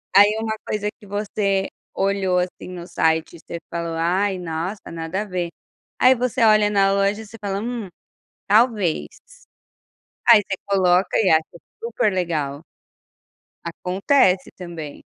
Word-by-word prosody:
Aí 205 +2 +7
uma 220 -1 -1
coisa 210 -1 -2
que 215 - -15
você 200 -1 -1 0.3
olhou, 195 -2 +1
assim, 180 0 -4
no 175 -1 -8
site 160 -2 0
e - - -17
você 170 - -7
falou: 170 -1 -3
"Ai, 185 +4 0
nossa, 175 +4 -5
nada 165 +4 -3
a - - -4
ver", 180 -3 -3 0.5
aí 255 +1 +6
você 250 -1 -1
olha 215 -1 +5
na 195 -1 +3
loja, 200 +2 +1
você 220 +1 -12
fala: 200 -1 -3
"Hum, 235 -1 -4 0.6
talvez". 210 -5 +3 1.2
Aí 230 -3 +9
você 195 -1 -4
coloca 185 -2 +2
e 200 - +3
acha 160 0 +5 0.4
super 230 -2 0
legal. 155 -6 -2 1.0
Acontece 185 +3 +1
também. 170 -5 -8
195 Hz, 140 wpm, -22 LUFS, 175-210 Hz, 1.2 s, Aí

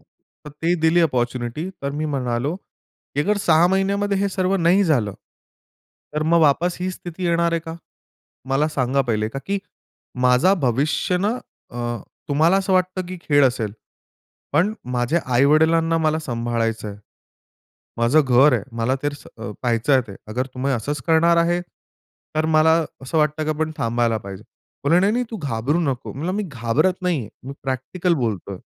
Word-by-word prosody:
तर 150 - -18
ती 165 +4 0
दिली 165 +2 +4
अपॉर्च्युनिटी. 125 +1 -1
तर 140 - -1
मी 150 +2 -3
म्हणालो 125 +4 -1
की 145 -6 -9
"अगर 205 +7 +1
6 165 +1 +5
महिन्यामध्ये 200 +1 +1
हे 200 0 +1
सर्व 190 0 0
नाही 185 +3 +3
झालं. 120 - +1 1.0
तर 155 - 0
मग 165 +1 +3
वापस 160 +4 +3
ही 185 +1 -1
स्थिती 180 0 -7
येणार 170 0 +2
आहे 165 - 0
का? 160 0 -7 0.8
मला 145 +3 +2
सांगा 135 -2 0
पहिले, 110 -4 -1
का 135 - -5
की 200 0 -1 0.7
माझा 125 +10 +5
भविष्य 140 +8 +1
ना 210 +6 0 0.3
अ, - - -11 0.5
तुम्हाला 160 +6 +4
असं 190 -1 0
वाटतं 185 0 +1
की 185 0 -7
खेळ 145 -2 +3
असेल. 115 -5 0 0.8
पण 185 +8 +3 0.2
माझ्या 120 +7 +1
आई-वडिलांना 160 +5 +4
मला 155 0 +1
सांभाळायचंय. 115 -6 -2 1.0
माझं 120 +7 +4
घर 135 +1 +5
आहे. 115 -5 +1
मला 115 +3 +1
तर 145 0 0 0.3
अ, 110 -2 -6
पहायचंय 125 +3 +2
ते. 100 - -8
अगर 125 +4 -2
तुम्ही 135 +2 -1
असच 140 +5 -3
करणार 165 +1 +4
आहे 170 +1 +2 0.8
तर 155 0 +2
मला 155 +1 +5 0.3
असं 145 +5 -1
वाटतं 150 +1 +1
की 155 - -1
आपण 155 +1 -1
थांबायला 115 -1 0
पाहिजे." 100 0 -9 0.4
म्हणले 165 +5 +4
"नाही, 200 +3 +3
नाही 245 +1 0
तू 225 - -4
घाबरू 140 +5 0
नको." 135 -5 -2
मी 135 - -10
म्हणलं 170 +5 -2
"मी 210 - 0
घाबरत 145 - 0
नाहीये. 155 - -1
मी 135 +2 -7
प्रॅक्टिकल 140 +7 -1
बोलतोय." 100 -3 -4
150 Hz, 165 wpm, -22 LUFS, 125-170 Hz, 1.0 s, 6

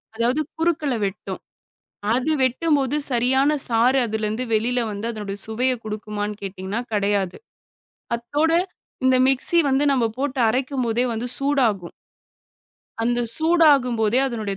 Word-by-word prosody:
அதாவது 240 +6 +1 0.2
குறுக்கல 320 -4 0
வெட்டும். 195 +1 -5 0.8
அது 260 +5 0
வெட்டும்போது 275 +1 +1 0.2
சரியான 265 +4 +2 0.2
சாறு 245 +3 +3
அதுலருந்து 220 +2 -2
வெளில 240 +3 +1
வந்து 205 +2 -5
அதனுடைய 205 -2 -6
சுவைய 245 +4 0
குடுக்குமான்னு 210 -1 -4
கேட்டீங்கன்னா 195 +3 -4
கிடையாது. 200 -2 0 0.8
அத்தோட 290 +7 -1 0.5
இந்த 260 0 +4
மிக்ஸி 270 +6 +3
வந்து 270 +2 +2
நம்ம 255 -4 +1
போட்டு 275 0 -2
அரைக்கும்போதே 250 -1 0
வந்து 230 +2 -3
சூடாகும். 245 -11 0 1.1
அந்தச் 240 0 +1
சூடாகும்போதே 275 -9 +3
அதனுடைய 215 -6 -4
240 Hz, 110 wpm, -22 LUFS, 215-270 Hz, 1.1 s, இந்த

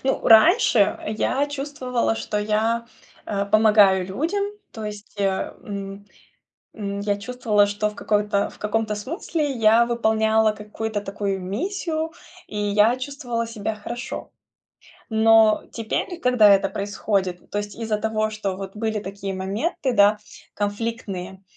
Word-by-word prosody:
ну, 270 - +1
раньше 230 - +5
я 255 +6 0
чувствовала, 275 -5 -2
что 210 -1 -3
я, 220 +3 0 0.4
э, 200 -1 -1
помогаю 205 -3 +5
людям, 325 - -1 0.3
то 220 -2 -7
есть, 210 0 -8
э, 195 -1 0
м, 200 0 -7 0.7
м, 200 -1 -4
я 205 0 0
чувствовала, 215 -2 +1
что 205 +1 -1
в 210 - -13
какой-то 205 -1 0
в - - -16
каком-то 215 0 -1
смысле 300 - -3
я 230 -1 +4
выполняла 220 -2 +2
какую-то 210 0 -5
такую 200 -1 -3
миссию, 320 - -3 0.4
и 210 - -7
я 210 +3 +3
чувствовала 255 -4 -4
себя 220 -1 -4
хорошо. 240 +4 -6 0.8
Но 220 -1 +5
теперь, 240 - -3
когда 245 -5 +5
это 195 0 +4
происходит, 195 -3 -2
то - - -3
есть 205 -1 -4
из-за 220 -2 -2
того, 215 0 -1
что 205 -3 -3
вот 195 +1 -8
были 220 -1 -1
такие 195 0 -5
моменты, 205 - -2
да, 205 0 +5 0.4
конфликтные, 205 -3 -4
215 Hz, 135 wpm, -23 LUFS, 205-235 Hz, 0.8 s, раньше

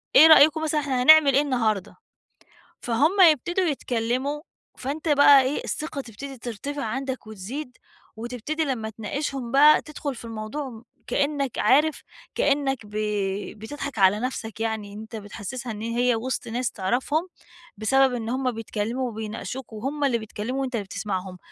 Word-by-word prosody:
إيه 310 +4 +10
رأيكم 315 0 +7
مثلًا، 310 -1 +1
إحنا 260 -3 -1
هنعمل 310 -1 +8
إيه 280 - +5
النهاردة، 220 -8 -1 0.9
فهُم 295 - +2
يبتدوا 350 +6 -1
يتكلّموا، 260 0 -1 0.4
فأنتَ 295 +5 -4
بقى 285 -1 +7
إيه، 265 +3 -2
الثقة 305 -2 -4
تبتدي 265 +3 -9
ترتفع 250 +5 -5
عَندك 260 +1 -4
وتزيد، 240 +7 -7 0.4
وتبتدي 245 +7 -3
لمّا 245 -7 -2
تناقشهم 245 +3 -4
بقى، 295 +3 +7
تدخُل 290 -2 -5
في 235 - -10
الموضوع 225 +6 -5
م 225 -2 -12 0.2
كإنّك 280 -3 -1
عارف 295 +8 +3 0.3
كإنّك 275 -1 +1
ب - - -14 0.7
بتضحك 275 +2 -6
عَلى 195 +2 +5
نفسَك 230 -3 -4
يعني، 220 -2 -3
إن 210 - -8
أنتَ 220 +1 -9
بتحسّسها 225 +4 -6
إنّ 215 0 -7
هي 240 +2 +1
وسط 250 +3 -3
ناس 245 +2 -2
تعرَفهم، 255 - -1 0.5
بسبب 265 +5 +3
إنّ 230 -2 -3
هُم 255 +1 0
بيتكلّموا 225 +2 -3
وبيناقشوك، 220 +3 -6
وهُم 270 +7 -3
اللي 265 -4 +2
بيتكلموا 225 +4 -4
وأنتَ 260 -2 -3
اللي 215 - -1
بتسمعهم. 190 -2 -4
255 Hz, 150 wpm, -25 LUFS, 220-285 Hz, 0.9 s, إيه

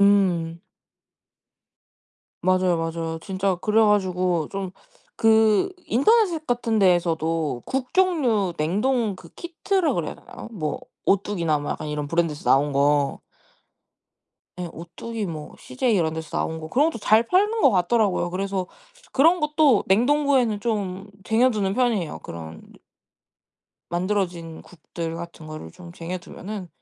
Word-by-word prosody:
음. 180 -5 +3 1.8
맞아요 185 -1 +2
맞아요. 165 0 -3
진짜 190 0 -1
그래가지고 185 -5 +2
좀 195 -2 -4 0.5
그 220 - +5 0.2
인터넷에 345 - +3
같은 235 -3 0
데에서도 165 -6 +1
국 260 -1 -3
종류 255 - +2
냉동 210 +7 0
그 170 - -14
키트라 345 -2 -1
그래야 170 -6 -3
되나요? - - -11
뭐 155 -9 -3 0.2
오뚜기나 180 -6 +1
뭐 145 - -5
약간 155 - -6
이런 150 -1 -3
브랜드에서 165 -3 -1
나온 140 +2 +4
거. 140 0 +2 1.4
예 175 -1 -4
오뚜기 205 +6 -6
뭐 155 -3 -7
씨제이 220 - -1
이런 160 -4 +1
데서 160 -1 -6
나온 160 0 -2
거 155 - -7
그런 290 - +3
것도 230 - -7
잘 215 +2 +4
팔리는 415 - +2
것 - - +6
같더라고요. 190 -1 +1
그래서 190 0 -2 0.5
그런 330 +6 +4
것도 300 -6 +3
냉동고에는 245 0 +2
좀 200 -3 -2 0.2
쟁여 235 +5 +3
두는 200 -4 -1
편이에요. 230 -10 0
그런 80 -1 -9 1.3
만들어진 175 -3 -2
국들 165 -1 -7
같은 170 -2 -9
거를 155 - -8
좀 175 -1 -12
쟁여 175 +2 -5
두면은 185 +1 -8
190 Hz, 285 characters per minute, -24 LUFS, 165-230 Hz, 1.8 s, 것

